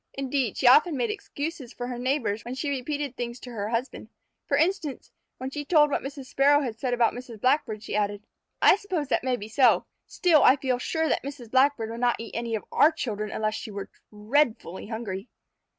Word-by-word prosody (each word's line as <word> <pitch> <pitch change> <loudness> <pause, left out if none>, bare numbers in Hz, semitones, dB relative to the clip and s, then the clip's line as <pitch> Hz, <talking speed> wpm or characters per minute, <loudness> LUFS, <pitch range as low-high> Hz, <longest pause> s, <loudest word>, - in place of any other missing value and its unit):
Indeed, 270 -4 -1
she - - -2
often 295 +5 +6
made 245 - 0
excuses 315 - -6
for 245 - -5
her 245 -1 -5
neighbors 245 -5 -1
when 245 +2 -6
she 285 +2 -2
repeated 280 0 -3
things 240 -1 -5
to 250 - -9
her 210 -2 -4
husband. 235 +3 -3 0.4
For 280 - +2
instance, 320 -3 -1 0.3
when 260 +1 -5
she 295 +1 -4
told 295 -1 +4
what - - 0
Mrs. 275 0 -7
Sparrow 285 +2 +4
had 230 -5 -4
said 250 -2 0
about 235 -1 +3
Mrs. 245 -3 -9
Blackbird, 240 -4 +1
she - - -4
added: 205 0 -1 0.4
"I - - +7
suppose 370 -9 -3
that - - +1
may 255 -1 +1
be 210 -3 -7
so, 245 +3 +4 0.2
still 335 -4 +3
I 260 - +7
feel 260 -3 -1
sure 320 +5 -1
that - - +1
Mrs. 265 -5 -8
Blackbird 260 -4 +3
would 230 - -6
not 245 -1 +2
eat 230 - -8
any 235 -1 -2
of 215 - -5
our 310 - +5
children 215 -9 -4
unless 215 0 -1
she 220 - -6
were 200 -1 -7 0.2
dreadfully 215 - 0
hungry." 220 -2 -5
255 Hz, 210 wpm, -26 LUFS, 225-285 Hz, 0.4 s, I